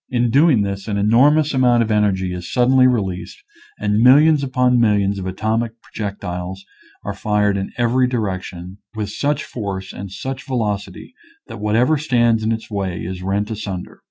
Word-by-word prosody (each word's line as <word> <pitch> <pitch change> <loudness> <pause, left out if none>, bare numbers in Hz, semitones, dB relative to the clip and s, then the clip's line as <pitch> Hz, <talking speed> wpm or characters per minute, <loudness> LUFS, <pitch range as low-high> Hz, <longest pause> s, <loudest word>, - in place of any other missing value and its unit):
In 120 -2 +1
doing 140 -5 +4
this 100 0 -4
an 105 -2 -2
enor 115 +8 +5
mous 155 0 +1
amount 125 -3 +3
of 110 - -3
energy 95 -4 +1
is 90 -1 -7
suddenly 130 +1 +4
released 95 -7 -2 0.4
and 105 0 0
millions 145 +5 +6
upon 125 -2 +2
millions 100 -3 +2
of 95 - -5
atomic 110 +4 -1
pro 110 - -7
jectiles 90 -2 -6 0.5
are - - -4
fired 105 -1 0
in 95 0 -3
every 125 +1 +2
direction 95 -5 -4 0.2
with 105 -2 -4
such 145 +7 -1
force 100 -5 -6
and 95 +1 -7
such 130 +7 -6
velocity 110 - -3 0.3
that - - -9
whatever 120 +8 +2
stands 120 -6 +2
in 110 +1 0
its 110 0 -4
way 95 -4 -3
is 90 +1 -6
rent 100 +3 -2
asunder. 100 -4 -6
110 Hz, 170 wpm, -19 LUFS, 100-125 Hz, 0.5 s, millions